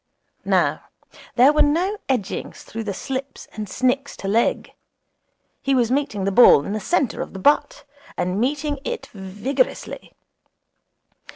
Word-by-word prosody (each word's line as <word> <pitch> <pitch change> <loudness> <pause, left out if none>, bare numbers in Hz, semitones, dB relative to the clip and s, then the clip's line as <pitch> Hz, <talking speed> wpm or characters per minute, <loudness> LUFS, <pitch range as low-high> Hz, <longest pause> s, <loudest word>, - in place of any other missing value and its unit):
Now - - +1 0.5
there 260 +4 +6
were 300 - +3
no 360 +8 +1
edgings 240 -8 -3
through 225 0 -7
the 205 - -2
slips 270 +4 -6
and 210 -2 -6
snicks 260 +4 -1
to 195 - -6
leg. 225 +4 +1 0.9
He 275 0 +1
was 245 -2 +2
meeting 270 -7 -1
the 195 - 0
ball 190 -9 +7
in 200 - -3
the 215 - -2
centre 275 - 0
of - - -6
the - - -7
bat, 290 +9 +2 0.3
and 180 +4 -1
meeting 290 +3 -1
it 480 +6 -4
vigorously. 210 - -3
255 Hz, 145 wpm, -22 LUFS, 210-285 Hz, 0.9 s, ball